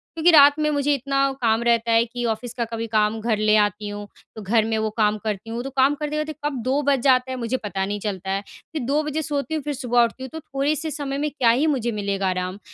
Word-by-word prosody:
क्योंकि 330 +2 +4
रात 290 -2 +7
में 305 0 +1
मुझे 290 0 +1
इतना 275 +1 -3 0.2
काम 225 0 +2
रहता 235 -1 +2
है 230 0 +5
कि 240 +1 -6
ऑफ़िस 225 +2 -8
का 235 - 0
कभी 230 0 -4
काम 215 0 +1
घर 225 -1 0
ले 215 0 +3
आती 210 0 0
हूँ। 205 0 -7 0.3
तो 220 - -7
घर 215 +2 +2
में 225 0 -1
वो 220 0 0
काम 215 -1 +2
करती 215 0 -4
हूँ। 235 +2 -4
तो 270 - -5
काम 270 +1 +2
करते, 300 0 -3
करते 305 0 -2
कब 275 -5 -2
2 265 +4 +1
बज 280 -2 +2
जाता 260 -1 +3
है 260 - -3
मुझे 240 +1 -2
पता 195 -4 -3
नहीं 205 +1 -3
चलता 190 -2 -4
है। 195 +1 -1
फ़िर 295 +7 -9
2 285 +4 +1
बजे 300 +1 -2
सोती 295 0 -3
हूँ 305 - -3
फ़िर 295 - -3
सुबह 245 -3 +2
उठती 235 +3 -3
हूँ 260 - -6
तो 320 - -5
थोड़े-से 300 +2 -2
समय 280 -2 -4
में 300 +1 -1
क्या 260 -5 +2
ही 260 +7 +3
मुझे 250 -6 0
मिलेगा 200 -2 -2
आराम 185 +1 -3
240 Hz, 265 wpm, -23 LUFS, 215-285 Hz, 0.3 s, रात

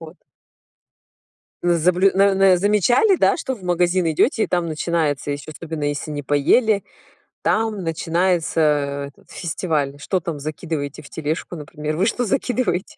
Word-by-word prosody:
вот. 165 +1 -11 1.5
Ну, 175 -1 +3
заблю 180 +4 +3
н 190 - +1 0.2
н 190 -2 +6
замечали, 210 - +3
да, - - +3
что 265 -5 -3
в 210 - -15
магазин 180 0 +1
идёте, 220 - +2
и - - -3
там 175 -1 0
начинается, 155 -3 -1
ещё 145 +2 -5
особенно 160 -1 -6
если 145 +1 -2
не 145 -1 -4
поели, 200 - +2 0.6
там 215 -3 0
начинается 165 +1 0 0.5
этот - - -23
фестиваль. 155 -5 -2
Что 185 +6 -1
там 165 -3 -5
закидываете 150 -1 -5
в - - -14
тележку, 160 +3 -4
например? 150 0 -5
Вы 185 - +2
что 245 +2 0
закидываете? 235 -4 -1
170 Hz, 150 wpm, -21 LUFS, 155-195 Hz, 1.5 s, н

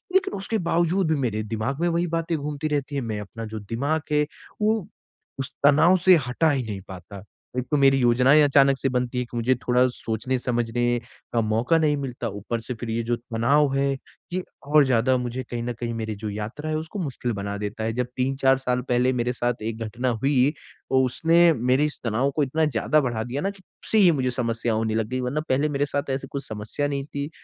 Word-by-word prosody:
लेकिन 390 0 +3
उसके 200 +3 -1
बावजूद 170 +2 +2
भी - - +3
मेरे 110 -4 -1
दिमाग 115 +6 -3
में 175 - +2
वही 170 +1 +1
बातें 165 0 -1
घूमती 150 +1 -3
रहती 145 -1 -2
हैं, 140 - 0
मैं 110 -3 -3
अपना 115 +3 -7
जो 110 0 -6
दिमाग 140 +10 -1
है, 150 0 +3 0.4
वो 215 -2 +1 0.5
उस 135 - -3
तनाव 160 +6 +6
से 185 -1 +9
हटा 155 +6 +2
ही 135 -3 0
नहीं 100 -3 -5
पाता। 95 +1 -10 0.4
एक 125 - -3
तो 150 - +3
मेरी 135 -1 +5
योजनाएँ 125 +5 +5
अचानक 140 -1 +5
से 135 - 0
बनती 125 0 -1
है - - 0
कि 120 - -8
मुझे 125 +3 +2
थोड़ा 125 +1 +4
सोचने-समझने 120 0 -1 0.3
का 115 - +3
मौका 115 +9 +2
नहीं 150 -2 +2
मिलता 130 -4 -4
ऊपर 105 +4 -4
से 125 - -5
फिर 115 0 -6
ये 115 +1 0
जो 120 +1 0
तनाव 130 +4 +1
है, 140 0 +2 0.4
ये 185 0 -1 0.2
और 150 0 +6
ज़्यादा 130 +1 +3
मुझे 125 +1 -3
कहीं 120 -1 -3
न 120 0 -2
कहीं 120 -1 -3
मेरी 110 -2 -3
जो 105 +1 -5
यात्रा 110 +9 -5
है 155 - 0
उसको 160 +6 -6
मुश्किल 130 -6 -3
बना 100 0 -4
देता 105 +1 -4
है। 110 0 -1
जब 125 0 -1
3-4 135 +1 +2
साल 125 -1 -1
पहले 125 +1 +3
मेरे 125 0 0
साथ 120 -2 -2
एक 110 0 -4
घटना 120 +4 -2
हुई, 130 +3 +2 0.4
तो 130 0 +4
उसने 165 +6 +4
मेरे 130 +3 +2
इस 150 - -4
तनाव 120 +5 +1
को 150 - +4
इतना 155 +4 +1
ज़्यादा 150 +3 +2
बढ़ा 120 -4 -2
दिया 130 +5 -4
ना 195 - 0
कि 200 -1 -10
तब - - -23
से 220 - +4
ही 180 -4 +7
मुझे 130 -4 0
समस्या 115 -2 -1
होने 110 0 0
लग 110 -1 0
गई 130 0 -2
वरना 135 +5 -1
पहले 140 +4 +2
मेरे 145 0 0
साथ 140 0 -3
ऐसी 135 0 -3
कुछ 140 0 -5
समस्या 110 +7 -3
नहीं 140 -1 -3
थी। 145 0 -5
130 Hz, 225 wpm, -24 LUFS, 115-145 Hz, 0.5 s, से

